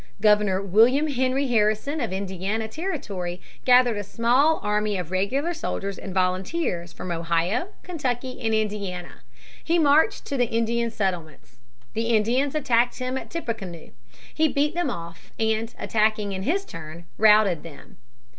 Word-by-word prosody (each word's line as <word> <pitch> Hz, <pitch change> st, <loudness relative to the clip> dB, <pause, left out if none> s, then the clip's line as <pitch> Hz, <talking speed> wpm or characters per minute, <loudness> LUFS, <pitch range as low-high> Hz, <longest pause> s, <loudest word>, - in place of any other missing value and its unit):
Governor 210 Hz, -2 st, +3 dB
William 235 Hz, -, +4 dB
Henry 260 Hz, +1 st, +1 dB
Harrison 220 Hz, +6 st, +1 dB
of 235 Hz, -, -2 dB
Indiana 195 Hz, +3 st, -2 dB
Territory 200 Hz, -, -4 dB, 0.3 s
gathered 250 Hz, -3 st, +5 dB
a 205 Hz, -, -3 dB
small 245 Hz, +9 st, +2 dB
army 210 Hz, -1 st, 0 dB
of 180 Hz, -2 st, -5 dB
regular 265 Hz, -, 0 dB
soldiers 200 Hz, -, -4 dB
and 195 Hz, -, -7 dB
volunteers 185 Hz, -, -1 dB
from 180 Hz, -, -7 dB
Ohio, 170 Hz, -, 0 dB, 0.2 s
Kentucky, 255 Hz, -7 st, -3 dB
and 225 Hz, -2 st, 0 dB
Indiana. 200 Hz, -5 st, -3 dB, 0.4 s
He 335 Hz, +1 st, +2 dB
marched 315 Hz, +6 st, +3 dB
to 280 Hz, -, -3 dB
the 245 Hz, -2 st, +1 dB
Indian 230 Hz, +1 st, 0 dB
settlements. 170 Hz, -, -4 dB, 0.4 s
The 225 Hz, +1 st, -1 dB
Indians 235 Hz, +6 st, +2 dB
attacked 245 Hz, -4 st, +2 dB
him 255 Hz, 0 st, -3 dB
at 265 Hz, -, -5 dB
Tippecanoe. 220 Hz, -, -5 dB, 0.4 s
He 315 Hz, 0 st, +3 dB
beat 295 Hz, 0 st, +1 dB
them 345 Hz, -4 st, 0 dB
off 170 Hz, -6 st, -8 dB
and, 220 Hz, +1 st, 0 dB
attacking 215 Hz, -2 st, +1 dB
in 190 Hz, -1 st, -4 dB
his 385 Hz, -, 0 dB
turn, 165 Hz, -, -9 dB
routed 210 Hz, -5 st, +5 dB
them. 160 Hz, -4 st, -13 dB
220 Hz, 145 wpm, -24 LUFS, 190-260 Hz, 0.4 s, gathered